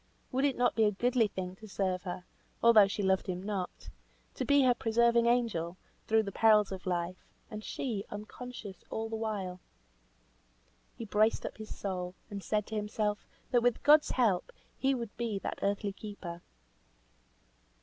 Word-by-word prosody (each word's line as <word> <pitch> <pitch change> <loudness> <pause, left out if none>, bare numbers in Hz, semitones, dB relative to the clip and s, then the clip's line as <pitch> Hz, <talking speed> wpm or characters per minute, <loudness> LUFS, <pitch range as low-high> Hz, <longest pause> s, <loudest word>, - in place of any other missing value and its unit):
Would 265 +2 +2
it 280 - +1
not 245 0 +3
be 225 - +3
a 210 - +4
goodly 235 +2 +2
thing 185 -2 -5
to 215 - -11
serve 190 -2 -1
her, 180 0 -5 0.4
although 220 -4 +8
she 200 +1 -3
loved 190 0 +2
him 185 0 -3
not; 195 -3 -4 0.4
to - - -3
be 285 -1 +4
her 250 -1 +5
preserving 235 0 +3
angel, 210 -8 +1 0.3
through 220 0 +4
the 200 - -5
perils 210 -1 +4
of 190 -1 -6
life; 175 0 -2 0.3
and 215 0 -6
she, 220 -6 -3
unconscious 210 -1 -8
all 225 0 -3
the 225 - -3
while? 205 -5 -3 1.4
He 230 - -6
braced 215 +1 +2
up - - -6
his 215 - -7
soul, 180 -2 -4 0.2
and 200 -1 -4
said 210 -1 0
to 220 - -6
himself, 210 0 -1 0.2
that 245 - +4
with 245 -1 +1
God's 300 +1 +6
help 215 -8 +1 0.2
he 270 0 +1
would 235 -4 -5
be 230 -3 -1
that - - -4
earthly 200 0 0
keeper. 195 -5 -8
210 Hz, 170 wpm, -31 LUFS, 190-235 Hz, 1.4 s, although